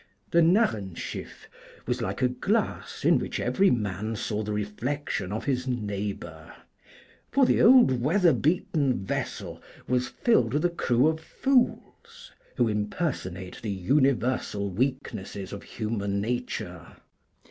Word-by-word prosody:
The 170 - +5
'Narrenschiff' 120 - 0 0.4
was - - -1
like - - -2
a - - +6
glass 195 - -2
in - - +5
which - - -4
every 195 0 +3
man 110 -1 -1
saw 105 0 -2
the 105 0 -4
reflection 105 0 -3
of 110 - -4
his 130 -2 -1
neighbor; 100 -8 -4 0.8
for 275 0 +4
the - - +3
old 235 - +6
weather 170 +5 +4
beaten 140 - 0
vessel - - -4 0.3
was 125 0 +1
filled 130 - +2
with 150 - +1
a 175 - +2
crew 130 -4 +2
of 160 0 0
fools, 265 - -1 0.3
who 120 -2 +3
impersonate 105 - -3
the 110 - -4
universal 120 -1 +1
weaknesses 100 -4 -3
of 100 - -6
human 105 -3 -3
nature. 120 +4 -4
120 Hz, 125 wpm, -27 LUFS, 100-150 Hz, 0.8 s, a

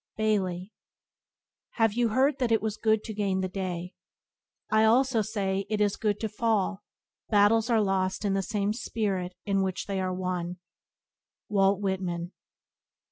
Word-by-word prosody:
—Bailey. 195 -3 -1 1.0
"Have 225 -3 +2
you 240 +1 +2
heard 265 +5 +2
that 245 -3 0
it 225 - +4
was 220 -1 -2
good 220 -1 +1
to 220 - -6
gain 195 -2 0
the 185 - -1
day? 180 -1 -4 0.8
I 215 0 +4
also 240 +1 +4
say 200 -2 -2
it 215 -1 -1
is 205 -1 +2
good 210 -1 -1
to 220 - 0
fall, 210 -2 0 0.5
battles 215 +2 +4
are 225 -2 +3
lost 190 +1 0
in 200 - +1
the 195 - +1
same 205 +1 -1
spirit 200 -6 -2
in 195 -1 +1
which 190 -1 -2
they 195 -2 -2
are 185 0 -1
won." 180 -1 -3 0.4
— - - -66
Walt 200 -1 +3
Whitman. 180 -3 -2
205 Hz, 160 wpm, -28 LUFS, 190-220 Hz, 1.0 s, it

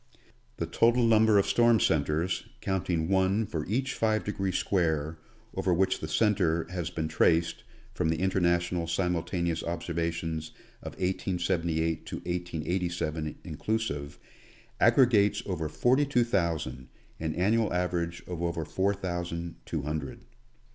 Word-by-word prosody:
The - - -1
total 120 +1 +3
number 110 -2 +5
of 100 - +4
storm 120 -1 +4
centers, 80 +5 +1
counting 90 -4 -1
one 95 +3 +2
for 80 -6 -4
each 130 +6 -1
6 110 -1 +1
de 105 - -1
gree 95 -1 -1
square 80 -5 0 0.3
over 95 - 0
which 95 +2 +2
the - - -4
centre 90 -7 +2
has 90 -4 -3
been 80 -1 -3
traced 85 +1 +2 0.3
from 80 - 0
the 80 -1 0
In 95 +1 +1
ternational 85 -2 +1
Simultaneous 85 -1 -1
observations 85 -2 -3 0.3
of - - -7
1878 85 -3 -1
to - - -4
1887, 85 -2 -2
inclusive, 80 -4 -3 0.6
aggregates 110 -6 +4
over 80 -5 -2
forty 130 - +2
two 125 -4 +3
thousand, 85 - -1 0.3
an 80 -1 -2
annual 110 +5 +2
average 90 -1 -1
of 90 -2 -5
over 85 -2 -1
four 95 +6 0
thousand 85 -2 -4
two 80 -4 -2
hundred. 75 -2 -4
85 Hz, 135 wpm, -29 LUFS, 80-95 Hz, 0.6 s, number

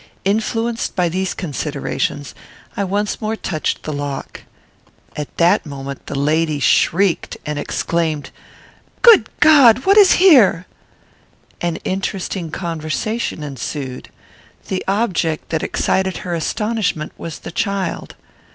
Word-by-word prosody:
Influenced 225 +3 -1
by 180 -2 +1
these 185 +2 -2
considerations, 145 - -3 0.4
I 200 - -1
once 200 +2 -2
more 220 +1 -1
touched 160 -7 -3
the 155 - -4
lock. 145 -1 -5 0.7
At 150 -1 -6
that 175 +5 +4
moment 140 -2 -8
the 140 - -4
lady 155 +1 +1
shrieked, 180 +5 +2
and 150 -1 -3
exclaimed, 155 -3 -2 0.7
"Good 465 -2 +7
God! 260 -6 +6
What 395 +2 +5
is 400 -3 +8
here?" 255 - +5 1.0
An 175 -1 -1
interesting 190 -2 -3
conversation 165 +4 -3
ensued. 135 -1 -6 0.6
The 190 - -2
object 190 -6 0
that 160 - -1
excited 190 -1 0
her 175 - -3
astonishment 180 -1 -1
was 165 -2 -7
the - - -9
child. 200 0 -3
175 Hz, 115 wpm, -19 LUFS, 155-210 Hz, 1.0 s, is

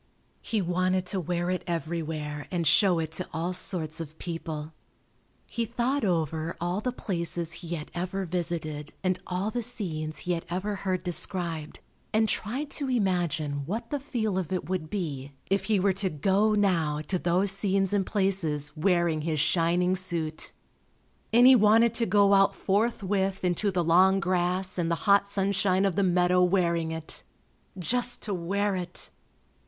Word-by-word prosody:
He 215 -4 -1
wanted 185 +1 +1
to 190 +1 -2
wear 175 +1 -1
it 185 - -2
everywhere 155 -3 -3
and 175 -3 -1
show 175 +4 +4
it 160 -1 -2
to 180 +3 -4
all 170 +3 -2
sorts 170 -3 -2
of 160 -1 -7
people. 160 -2 -5 0.7
He 235 - -2
thought 245 +5 -1
over 165 -3 -1
all 175 +4 -1
the 250 - -1
places 170 -7 -3
he 170 0 -5
had 150 -2 -7
ever 185 +2 -3
visited 160 -4 -3
and 185 -1 +1
all 185 +4 -2
the 245 - -2
scenes 170 -10 -3
he 180 - -3
had 170 -1 -1
ever 195 +4 -2
heard 185 -2 -2
described, 175 -3 -1 0.3
and 220 0 +3
tried 260 +9 -2
to 280 -2 -3
imagine 170 - 0
what 230 +5 -4
the 290 - -1
feel 220 -8 -1
of 180 -3 -4
it 180 -5 -2
would 180 -4 -3
be 145 -8 -4 0.2
if 195 -1 +2
he 215 -2 +2
were 195 +1 +3
to 190 0 0
go 195 +7 +2
now 165 -7 +1
to 180 +4 -2
those 180 +3 +2
scenes 195 -1 0
and 195 -2 +1
places 170 -8 0
wearing 170 -1 +2
his 155 -1 -1
shining 175 +4 +2
suit, 170 -4 -3 0.8
and 240 +2 +6
he 260 0 +9
wanted 225 +1 +5
to 230 -1 0
go 200 +1 +4
out 195 0 +4
forthwith 195 -2 0
into 180 +4 +1
the 180 -2 0
long 185 +4 +5
grass 180 +1 0
and 165 -1 0
the 170 - +2
hot 200 -1 +5
sunshine 195 -1 +1
of 190 -4 +1
the - - +2
meadow 180 -1 +3
wearing 170 -3 +2
it. 160 -1 -6 0.6
Just 245 +7 -1
to 210 - -3
wear 195 +3 0
it! 180 -1 -6
180 Hz, 170 wpm, -27 LUFS, 165-200 Hz, 0.8 s, he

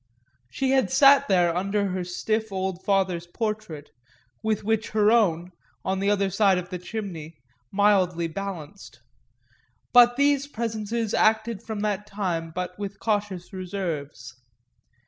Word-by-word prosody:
She 265 - -1
had 265 -8 +3
sat 280 +3 +6
there 175 -3 +3
under 200 +2 0
her 185 0 -2
stiff 215 +5 -2
old 190 -1 -3
father's 190 -4 0
portrait, 210 -7 -4 0.5
with 220 -1 -1
which 220 +1 0
her 210 0 +5
own, 180 -6 +2 0.3
on 190 0 -1
the 200 +1 +1
other 200 -1 +1
side 195 -1 +3
of 180 0 -5
the 180 - -4
chimney, 175 -5 -6 0.4
mildly 190 -4 +2
balanced; 175 -3 -7 0.9
but 245 0 +7
these 280 0 +2
presences 225 -3 -3
acted 220 -1 +2
from 220 -2 -5
that 210 -1 -2
time 180 -5 -3
but 180 +3 -5
with 200 -1 -6
cautious 205 -4 -2
reserves. 170 -9 -5
200 Hz, 135 wpm, -25 LUFS, 180-220 Hz, 0.9 s, but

